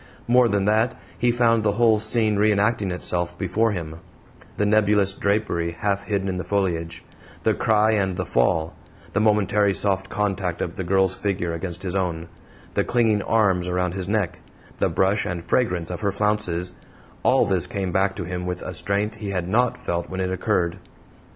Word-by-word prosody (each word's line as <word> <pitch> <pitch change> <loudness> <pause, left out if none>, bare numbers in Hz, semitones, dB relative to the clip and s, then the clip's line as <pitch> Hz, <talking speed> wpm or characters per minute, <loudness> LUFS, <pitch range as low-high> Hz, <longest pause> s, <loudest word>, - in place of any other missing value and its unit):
More 125 0 +5
than 100 -3 +1
that, 110 +3 +1 0.2
he 120 0 +2
found 115 -2 +2
the 105 -1 +2
whole 110 0 +4
scene 110 0 +1
re 105 +1 +4
enacting 105 0 +1
itself 90 -1 -2
before 105 +5 +1
him; 80 -5 -5 0.6
the 105 - +1
nebulous 105 -2 +3
drapery 95 -5 -1
half 100 +2 -1
hidden 100 -2 -1
in 95 -1 -2
the 90 - -3
foliage, 85 -5 -2 0.4
the - - +3
cry 110 0 +2
and 95 -4 0
the 90 - -2
fall; 80 +1 +1 0.4
the 100 - +1
momentary 105 -2 +2
soft 95 -1 0
contact 95 -4 -1
of 85 - -3
the 95 - -3
girl's 95 +1 +2
figure 95 -5 -2
against 85 +1 -5
his 95 -1 -3
own, 85 -3 -2 0.4
the - - +1
clinging 115 -4 +2
arms 95 -5 +2
around 90 -1 -1
his 95 -1 -4
neck, 105 -5 -1 0.4
the - - +2
brush 95 +3 +1
and 85 -1 -4
fragrance 90 -5 0
of 90 - -5
her 100 - +1
flounces 95 -4 -1 0.5
all - - +4
this - - 0
came 95 -2 -3
back 95 +1 +1
to - - -4
him 90 +1 -4
with 90 0 -4
a 90 - -5
strength 100 +5 -1
he 105 -2 -5
had 90 -3 -2
NOT 120 +6 +2
felt 85 0 -3
when 95 - -5
it 95 0 -1
occurred. 95 -2 0
95 Hz, 185 wpm, -23 LUFS, 90-105 Hz, 0.6 s, More